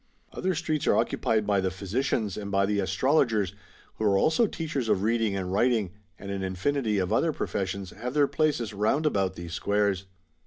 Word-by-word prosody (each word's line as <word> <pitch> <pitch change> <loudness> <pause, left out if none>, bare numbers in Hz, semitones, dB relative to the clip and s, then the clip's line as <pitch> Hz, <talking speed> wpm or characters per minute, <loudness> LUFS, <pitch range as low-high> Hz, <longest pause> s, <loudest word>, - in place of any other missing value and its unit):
* - - -31
Other 185 -1 -1
streets 155 -2 -1
are - - +4
occupied 110 -1 +1
by 100 -2 +2
the 95 - 0
Physicians, 105 +2 -2
and 100 -1 -5
by 100 0 +2
the 105 0 0
Astrologers, 105 - +2 0.4
who 110 - -1
are 100 -2 +4
also 160 - +3
teachers 150 - -3
of 100 -2 +2
reading 110 -2 +1
and 95 -1 -3
writing; 110 -3 +2 0.3
and 100 0 -7
an 100 -1 -3
infinity 105 +5 0
of 95 +2 0
other 160 +8 +2
professions 95 -7 -3
have 125 +6 -6
their 145 -1 +4
places 140 -9 0
round 110 +10 +1
about 95 -9 +1
those 85 -1 -7
squares. 100 0 0
105 Hz, 190 wpm, -27 LUFS, 95-130 Hz, 0.4 s, are